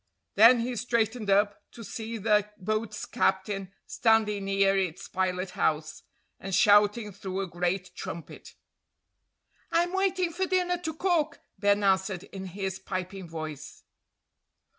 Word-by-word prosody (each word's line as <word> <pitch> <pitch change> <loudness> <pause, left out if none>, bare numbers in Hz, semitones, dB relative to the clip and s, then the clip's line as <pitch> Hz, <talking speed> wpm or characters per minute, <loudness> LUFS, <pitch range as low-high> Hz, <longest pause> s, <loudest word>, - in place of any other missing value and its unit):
Then 230 +3 +7
he 245 +1 -2
straightened 230 -2 -1
up, 205 +1 +2
to 230 - -10
see 225 +1 -5
the 210 -1 +2
boat's 215 +2 -3
captain 195 0 -1
standing 215 -3 +2
near 195 0 +3
its 185 -4 -2
pilot 185 0 -1
house, 155 0 -1 0.4
and 195 -1 -3
shouting 210 -1 +4
through 190 -1 -5
a - - -2
great 180 +2 -2
trumpet. 170 - -8 1.2
"I'm 345 +2 +2
waiting 380 -3 +1
for 375 +2 -1
dinner 360 -1 +1
to 320 -3 -4
cook," 345 -3 0 0.2
Ben 205 0 +3
answered 190 -1 +1
in 190 -1 -8
his 190 0 -4
piping 185 -1 -5
voice. 155 -3 -7
205 Hz, 130 wpm, -28 LUFS, 190-230 Hz, 1.2 s, Then